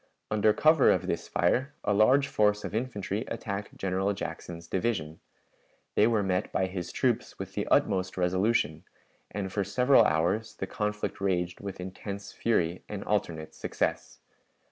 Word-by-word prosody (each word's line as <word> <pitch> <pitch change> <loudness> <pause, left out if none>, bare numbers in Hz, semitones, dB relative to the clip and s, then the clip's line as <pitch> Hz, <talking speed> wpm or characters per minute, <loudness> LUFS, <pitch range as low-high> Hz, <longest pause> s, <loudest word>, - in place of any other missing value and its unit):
Under 105 0 +4
cover 155 +4 +5
of - - +2
this - - -2
fire 130 +11 +1
a 105 - +2
large 130 +7 +5
force 105 -4 +2
of - - -5
infantry 110 -3 -2
attacked 100 -1 -5
General 95 +1 0
Jackson's 85 -3 -6
division. 85 -4 -2 0.7
They 105 - +5
were 110 -3 +2
met 95 0 -1
by 95 - +1
his 90 -1 -5
troops - - 0
with - - -7
the - - -2
utmost 95 -1 +2
resolution, 90 -3 +1 0.5
and 95 -2 -4
for 100 - +1
several 125 +4 +5
hours 105 +6 +1
the - - -3
conflict 105 -1 -3
raged 90 -3 0
with 100 -2 -6
intense 100 +2 -6
fury 90 -6 0
and 100 -1 -5
alternate 85 -7 -2
success. - - -3
100 Hz, 150 wpm, -29 LUFS, 90-110 Hz, 0.7 s, cover